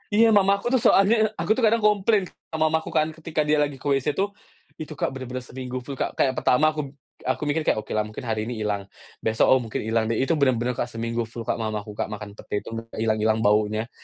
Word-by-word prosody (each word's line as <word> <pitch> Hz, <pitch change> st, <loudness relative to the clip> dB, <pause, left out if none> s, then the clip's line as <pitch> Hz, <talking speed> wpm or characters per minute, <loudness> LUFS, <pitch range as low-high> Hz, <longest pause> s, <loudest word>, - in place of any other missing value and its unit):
Iya 230 Hz, +1 st, +6 dB
mamaku 200 Hz, +1 st, +3 dB
tuh 255 Hz, -, +3 dB
soalnya 200 Hz, +4 st, +6 dB, 0.2 s
aku -, -, -3 dB
tuh 255 Hz, -, -1 dB
kadang 225 Hz, +1 st, +3 dB
komplain 210 Hz, -1 st, +3 dB, 0.2 s
sama 160 Hz, -1 st, 0 dB
mamaku 160 Hz, 0 st, 0 dB
kan 155 Hz, -, +3 dB
ketika 160 Hz, -1 st, -2 dB
dia 150 Hz, -, +3 dB
lagi 145 Hz, -2 st, -1 dB
ke -, -, -16 dB
WC 135 Hz, -2 st, -1 dB
tuh, 195 Hz, +1 st, +2 dB, 0.5 s
itu 155 Hz, 0 st, -6 dB
Kak -, -, 0 dB
bener-bener 130 Hz, -1 st, -6 dB
seminggu 130 Hz, -1 st, -6 dB
full 140 Hz, -, -5 dB
Kak. -, -, -2 dB
Kayak 130 Hz, -, +2 dB
pertama 140 Hz, +5 st, +3 dB
aku 155 Hz, -, -2 dB
p -, -, -17 dB, 0.4 s
aku 130 Hz, -, 0 dB
mikir 150 Hz, +2 st, 0 dB
kayak, -, -, +3 dB
okelah 110 Hz, -, -1 dB
mungkin 110 Hz, +4 st, -8 dB
hari 110 Hz, -1 st, -1 dB
ini 125 Hz, -, -3 dB
hilang, 105 Hz, -1 st, -1 dB, 0.4 s
besok 110 Hz, 0 st, +2 dB
oh 130 Hz, -, +4 dB
mungkin 115 Hz, -2 st, -4 dB
hilang 110 Hz, 0 st, +1 dB
deh, 115 Hz, -, 0 dB
itu 150 Hz, -, +1 dB
bener-bener 125 Hz, -3 st, +2 dB, 0.2 s
seminggu 115 Hz, 0 st, -3 dB
full 115 Hz, 0 st, -7 dB
Kak, -, -, -1 dB
mamaku 105 Hz, -1 st, -3 dB
Kak -, -, -3 dB
makan 105 Hz, -1 st, -7 dB
pete -, -, -12 dB
itu, -, -, -7 dB, 0.2 s
gak -, -, -11 dB
hilang-hilang 110 Hz, 0 st, +1 dB
baunya. 105 Hz, +2 st, +2 dB
130 Hz, 225 wpm, -24 LUFS, 110-160 Hz, 0.5 s, Iya